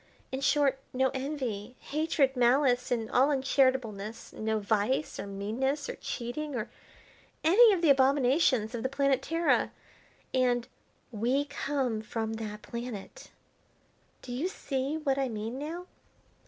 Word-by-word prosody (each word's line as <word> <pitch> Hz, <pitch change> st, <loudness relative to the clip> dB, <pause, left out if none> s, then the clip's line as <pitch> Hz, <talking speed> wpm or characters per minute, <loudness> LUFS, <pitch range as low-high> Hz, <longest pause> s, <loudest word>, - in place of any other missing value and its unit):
In 265 Hz, +1 st, -3 dB
short, 280 Hz, -1 st, +3 dB
no 265 Hz, +1 st, +2 dB
envy, 255 Hz, -5 st, -4 dB
hatred, 295 Hz, -3 st, +1 dB
malice, 250 Hz, 0 st, +3 dB
and 230 Hz, -3 st, 0 dB
all 265 Hz, +3 st, +4 dB
uncharitableness; 260 Hz, -6 st, 0 dB
no 220 Hz, 0 st, -1 dB
vice, 215 Hz, +7 st, 0 dB
or -, -, -4 dB
meanness, 230 Hz, +9 st, -2 dB
or -, -, -4 dB
cheating, 275 Hz, +4 st, -4 dB
or 235 Hz, -1 st, -3 dB, 0.7 s
any 430 Hz, +8 st, +7 dB
of 365 Hz, -4 st, 0 dB
the 310 Hz, -, +7 dB
abominations 265 Hz, -3 st, +3 dB
of 235 Hz, -, -3 dB
the 260 Hz, -, -1 dB
planet 275 Hz, -1 st, +2 dB
Terra, 330 Hz, +3 st, +1 dB, 0.6 s
and 245 Hz, -2 st, +2 dB, 0.4 s
we 245 Hz, +6 st, +1 dB
come 275 Hz, -5 st, -2 dB
from 220 Hz, 0 st, -3 dB
that 210 Hz, -1 st, -6 dB
planet. 235 Hz, -, -7 dB, 0.9 s
Do 250 Hz, -, -8 dB
you 265 Hz, +8 st, -1 dB
see 275 Hz, -4 st, -2 dB
what 275 Hz, -3 st, 0 dB
I 270 Hz, -2 st, 0 dB
mean 225 Hz, +3 st, -4 dB
now?" 330 Hz, +5 st, -5 dB
260 Hz, 135 wpm, -30 LUFS, 230-285 Hz, 0.9 s, any